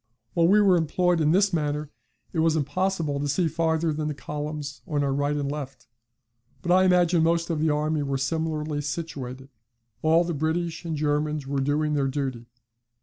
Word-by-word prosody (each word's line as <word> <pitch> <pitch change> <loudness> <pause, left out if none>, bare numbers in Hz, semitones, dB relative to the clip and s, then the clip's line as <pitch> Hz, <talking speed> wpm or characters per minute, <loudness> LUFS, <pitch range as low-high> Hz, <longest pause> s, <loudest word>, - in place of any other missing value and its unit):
While 170 -1 +3
we 205 +4 +5
were 195 -3 +5
employed 175 +1 +1
in 155 0 +3
this 195 +2 +3
manner 150 -2 -1 0.4
it 165 - -1
was 160 0 +3
impossible 155 0 -1
to 145 - -1
see 165 +4 +1
farther 160 0 0
than 150 0 -2
the 150 - -3
columns 150 0 -5
on 145 -2 0
our 140 -1 0
right 145 +1 0
and 145 -1 -2
left, 135 -3 -7 0.8
but 175 - 0
I 185 +1 +5
imagine 175 -2 +4
most 165 +1 +1
of 160 - -1
the 160 +1 +2
army 150 +1 0
were 140 -1 -1
similarly 155 +1 -2
situated: 140 -4 -5 0.5
all 160 +2 +4
the 170 0 -3
British 160 +3 -2
and 165 -2 -2
Germans 150 0 0
were 135 0 -1
doing 150 +2 0
their 140 -2 +1
duty. 130 -4 -3
155 Hz, 185 wpm, -25 LUFS, 145-165 Hz, 0.8 s, we